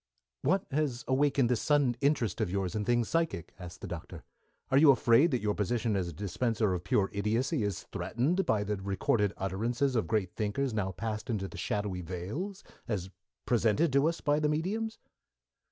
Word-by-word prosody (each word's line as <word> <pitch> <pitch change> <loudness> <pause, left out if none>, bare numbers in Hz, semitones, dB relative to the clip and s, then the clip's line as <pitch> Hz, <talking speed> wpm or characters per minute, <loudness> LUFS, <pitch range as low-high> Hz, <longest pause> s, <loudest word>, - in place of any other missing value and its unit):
"What 190 0 +1
has 135 -4 -1
awakened 135 -1 +3
this 120 -2 +1
sudden 145 -5 +3
interest 140 -6 +1
of - - 0
yours 95 0 -1
in 105 -2 -2
things 120 -2 +2
psychic?" 165 - -1
asked 90 -1 -9
the - - -5
Doctor. - - -7 0.5
"Are 135 - +5
you 155 0 +7
afraid 130 +3 +5
that 125 -7 -1
your 105 -1 +1
position 110 +1 0
as 95 -3 0
a - - -5
dispenser 105 +4 0
of 90 -1 -3
pure 95 +1 +1
idiocy 115 +8 0
is 100 -4 -2
threatened 160 +11 0
by 105 - +1
the 105 0 -2
recorded 100 +1 0
utterances 115 +8 -1
of 115 - +1
great 100 -5 0
thinkers 110 +5 -1
now 100 -3 -1
passed 110 +5 -4
into 100 -4 -1
the - - -11
shadowy 100 -3 -2
vales, 105 - -5 0.2
as 95 -5 -3 0.3
presented 125 +6 +2
to 140 +2 +4
us 170 - -5
by 145 0 +2
the 150 -1 +1
mediums?" 210 +9 -1
115 Hz, 185 wpm, -30 LUFS, 100-140 Hz, 0.5 s, you